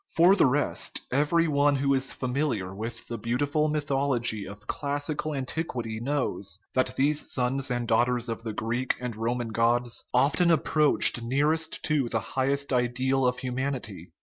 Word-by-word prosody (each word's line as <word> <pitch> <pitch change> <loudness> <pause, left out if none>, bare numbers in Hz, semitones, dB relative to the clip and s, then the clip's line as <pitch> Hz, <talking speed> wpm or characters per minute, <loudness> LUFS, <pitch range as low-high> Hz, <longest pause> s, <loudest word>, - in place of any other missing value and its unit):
For 175 +4 +6
the 175 - +5
rest, 145 +3 -1
every 150 +5 +2
one 145 -1 +3
who 140 0 +1
is 135 0 0
familiar 125 -8 -2
with 115 +3 -6
the 115 -2 -5
beautiful 145 +7 0
mythology 135 -8 0
of 105 +2 -11
classical 145 +2 -2
an 135 -2 -2
tiquity 120 -8 -4
knows 120 -9 -2
that 130 0 0
these 145 +3 +1
sons 130 +2 0
and 120 -1 -2
daughters 120 +1 +2
of 115 -1 -4
the 115 -1 -4
Greek 120 +4 -1
and 125 -2 -4
Roman 120 +1 -2
gods 120 +1 +1
often 140 +7 +3
approach 150 -5 +3
nearest 150 +7 0
to 145 -6 +1
the 115 - 0
highest 140 +1 0
ideal 130 +2 +1
of 125 0 0
humanity. 130 -5 -4
130 Hz, 155 wpm, -27 LUFS, 120-145 Hz, -, For